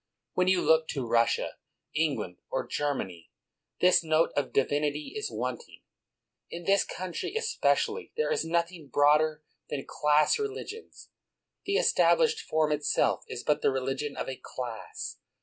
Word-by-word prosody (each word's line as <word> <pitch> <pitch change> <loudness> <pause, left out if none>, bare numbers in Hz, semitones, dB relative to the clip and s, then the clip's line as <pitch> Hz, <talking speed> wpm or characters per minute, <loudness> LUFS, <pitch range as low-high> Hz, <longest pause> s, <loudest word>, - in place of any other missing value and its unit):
When 180 0 +2
you 185 -1 +3
look 160 0 +4
to 135 -4 -3
Russia, 115 0 +1 0.4
England, 135 - -1
or - - -2
Germany, 95 - -3 0.5
this 180 -1 +5
note 160 +1 +2
of 145 - 0
divinity 145 +2 0
is 430 - -3
wanting. 475 - -5 0.7
In 175 - -7
this 195 +3 +3
country, 185 - -5
espe 455 0 -3
cially, 450 +1 +1
there 470 +2 +1
is 465 - +1
nothing 170 -1 -1
broader 150 +3 +3 0.3
than 140 -2 -4
class 150 - +3
relig 420 -1 -4
ions; 450 - -13 0.6
the 400 - +1
established 475 -1 +4
form 155 -1 +1
itself 150 0 +1
is - - -6
but 150 0 +1
the - - +3
relig 135 0 -1
ion 145 -1 -5
of - - -3
a 130 -1 -6
class. 120 -4 -6
155 Hz, 150 wpm, -29 LUFS, 140-185 Hz, 0.7 s, this